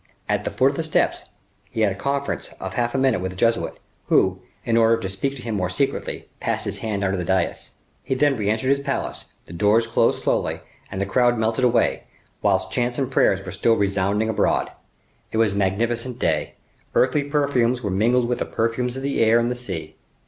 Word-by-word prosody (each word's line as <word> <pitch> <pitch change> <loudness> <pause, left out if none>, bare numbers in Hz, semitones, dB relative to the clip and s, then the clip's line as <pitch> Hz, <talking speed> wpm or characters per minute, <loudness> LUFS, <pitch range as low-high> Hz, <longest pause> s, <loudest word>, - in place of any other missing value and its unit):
At - - 0
the - - 0
foot 130 +2 +3
of 140 - -8
the - - 0
steps, 160 -1 0 0.4
he 110 - -3
had 105 -2 +3
a - - -4
conference 140 +5 -2
of 95 0 -5
half 120 +4 -1
a - - +2
minute 130 -8 +2
with 95 0 -3
a - - -13
Jesuit, 115 +4 +1 0.3
who, 95 0 +3 0.3
in 115 -1 +1
order 115 0 +5
to 95 - -3
speak 100 +9 -2
to 125 - -9
him 115 - -3
more 90 -3 -1
secretly, 135 +9 -2
passed - - -1
his - - -2
head 105 -3 -2
under 95 0 +1
the 90 - -2
dais. 95 0 -1 0.3
He 130 - -2
then 145 +1 +3
re 105 -4 -1
entered 110 +4 0
his 140 - +3
palace; 140 -1 -3 0.2
the - - -10
doors 105 +6 +3
closed 115 - +1
slowly, - - 0 0.3
and 95 - -4
the 100 - 0
crowd 120 +4 +2
melted 110 +3 +1
away, 120 -1 +2 0.4
whilst - - +1
chants 120 0 -1
and 135 -1 -1
prayers - - +2
were - - -5
still 115 - +2
resounding 100 +1 +1
abroad. 110 - +1 0.6
It - - -2
was 110 -3 +3
a - - -3
magnificent 115 +5 0
day. 80 -9 -1 0.4
Earthly 140 +3 +3
perfumes 130 -4 +1
were 100 - -1
mingled 120 +5 +2
with 125 0 -1
the - - -1
perfumes 120 +3 -1
of 135 - -5
the 140 -4 +1
air 115 +1 +5
and 120 +1 +1
the - - -2
sea. 100 -10 -6
115 Hz, 215 wpm, -23 LUFS, 100-125 Hz, 0.6 s, order